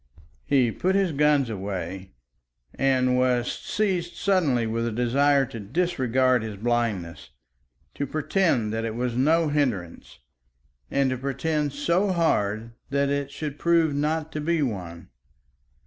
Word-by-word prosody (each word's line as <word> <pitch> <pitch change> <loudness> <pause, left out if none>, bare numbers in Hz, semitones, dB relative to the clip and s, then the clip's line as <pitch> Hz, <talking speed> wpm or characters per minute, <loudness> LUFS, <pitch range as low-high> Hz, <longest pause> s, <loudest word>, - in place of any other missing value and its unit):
He 130 -5 +3
put 185 - 0
his 195 -3 +2
guns 145 -2 +3
away, 95 -3 -5 0.6
and 130 -2 +2
was 125 -1 +1
seized 180 -5 -2
suddenly 155 - +1
with 115 +1 -1
a - - -2
desire 135 +4 +2
to 115 - -8
disregard 130 - +1
his 110 -2 -5
blindness, 110 -7 -2 0.6
to 140 - -3
pretend 155 - 0
that 115 0 -2
it 115 -1 -3
was 120 0 -2
no 155 +5 +3
hindrance 120 - -2 0.7
and 135 -1 +1
to 130 - -3
pretend 145 +2 -1
so 170 +7 +1
hard 115 - 0 0.2
that 140 0 +1
it 140 -1 -1
should 145 0 -6
prove 165 -3 +3
not 155 +2 -1
to 150 - -4
be 165 0 +1
one. 90 - -5
135 Hz, 135 wpm, -25 LUFS, 115-155 Hz, 0.7 s, He